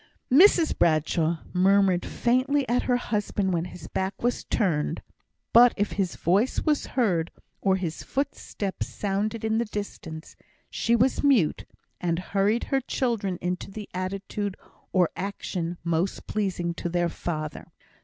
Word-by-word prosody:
Mrs 335 +3 +6
Bradshaw 160 0 +1
murmured 190 0 +3
faintly 255 +3 +1
at 245 +2 +2
her 245 - +4
husband 205 -4 -1
when 170 0 0
his 175 -3 -9
back 190 +3 -3
was 245 0 0
turned; 160 -8 0 0.5
but 240 +1 +7
if 205 0 0
his 190 -3 -1
voice 200 +9 +1
was 300 -2 +1
heard, 175 -9 +2 0.3
or 190 -1 +3
his 175 -4 -3
footsteps 215 -7 -3
sounded 210 +3 -2
in 220 0 +1
the 235 - 0
distance, 190 -7 -7 0.4
she 235 - +1
was 250 +3 +2
mute, 255 - +3 0.3
and 170 -1 0
hurried 200 +5 +1
her 270 -1 0
children 230 -8 -1
into 180 +2 -2
the 210 +1 -7
attitude 195 +2 -3 0.3
or 180 -3 +3
action 180 -3 -4
most 170 +3 -1
pleasing 185 -5 -1
to 175 - -4
their 175 0 +1
father. 155 -3 -5
195 Hz, 140 wpm, -26 LUFS, 175-230 Hz, 0.5 s, but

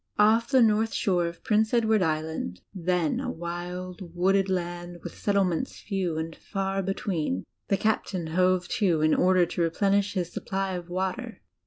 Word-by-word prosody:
Off 220 +3 +4
the 260 -3 +5
north 220 0 +2
shore 175 -3 +1
of 170 0 -8
Prince 220 +2 +2
Edward 220 -3 +3
Island, 155 - -2
then 180 -3 0
a - - -3
wild, 175 +1 -6
wooded 195 +2 +2
land, 175 -1 -3
with - - -6
setdements 200 +1 0
few 185 -6 -2
and 160 0 -4
far 195 0 -2
between, 175 - -2 0.2
the 195 - +2
Captain 200 -5 0
hove 180 +2 +2
to 175 -8 +1
in 155 0 +4
order 185 -1 +4
to 170 - -3
replenish 200 +4 +1
his 175 -2 -2
supply 195 0 -2
of 175 -1 -6
water. 190 +5 -3
185 Hz, 160 wpm, -27 LUFS, 175-200 Hz, 0.2 s, the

